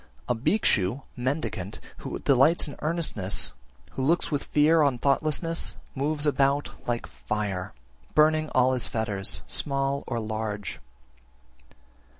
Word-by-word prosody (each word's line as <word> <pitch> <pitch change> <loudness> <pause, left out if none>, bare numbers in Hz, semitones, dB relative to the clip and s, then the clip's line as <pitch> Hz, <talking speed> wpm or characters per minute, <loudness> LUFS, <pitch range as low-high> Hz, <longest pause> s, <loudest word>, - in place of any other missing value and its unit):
31. 125 - +1
A 115 - -10
Bhikshu 125 - +2
(mendicant) 125 - -3 0.2
who - - -5
delights 140 +6 +4
in 145 - -7
earnestness, 110 - 0 0.4
who 130 - -3
looks 165 +5 +2
with 145 -1 -1
fear 155 +2 +4
on 140 -4 +3
thoughtlessness, 155 +5 0 0.2
moves 145 +2 -1
about 140 0 +2 0.2
like 120 -1 -1
fire, 100 -3 -3 0.4
burning 155 0 +4
all 130 0 +4
his 125 - +1
fetters, 100 -7 -1
small 140 -1 -1
or 120 -2 -1
large. 110 -2 -4
135 Hz, 125 wpm, -27 LUFS, 110-150 Hz, 0.4 s, delights